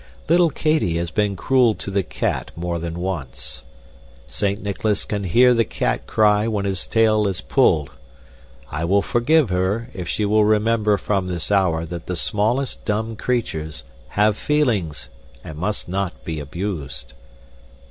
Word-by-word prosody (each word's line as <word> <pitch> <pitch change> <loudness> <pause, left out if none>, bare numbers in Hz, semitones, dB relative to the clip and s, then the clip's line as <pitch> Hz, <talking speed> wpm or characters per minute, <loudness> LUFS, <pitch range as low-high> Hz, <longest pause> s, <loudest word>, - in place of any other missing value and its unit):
Little 170 +1 +5
Katy 155 - +1
has 85 -1 -2
been 105 -2 0
cruel 125 +2 +3
to 100 - -5
the 100 0 +2
cat - - -2
more 85 0 -3
than 85 0 -5
once. 90 -7 -5 0.6
Saint 100 0 -2
Nicholas 105 +1 -1
can 100 -2 -3
hear 125 +8 +5
the 115 -1 +3
cat - - -2
cry 105 0 +3
when 105 -3 -1
its 95 -2 -2
tail 110 -2 +3
is 95 -1 -2
pulled. 90 - +2 0.8
I 75 +3 -3
will 100 +4 +2
forgive 125 0 +2
her 100 +7 -1
if 90 -3 -6
she 105 - 0
will 105 +1 +4
remember 105 0 +2
from 95 0 -1
this 90 +1 -3
hour 90 -5 +2
that 85 0 -7
the 90 - -2
smallest 110 +9 0
dumb 110 +1 -2
creatures 80 - -2 0.3
have 105 0 +4
feelings 105 - 0 0.3
and 80 - -8
must 105 +4 -2
not 95 0 -3
be 80 -2 -3
abused." 75 -3 -5
100 Hz, 155 wpm, -21 LUFS, 85-110 Hz, 0.8 s, Little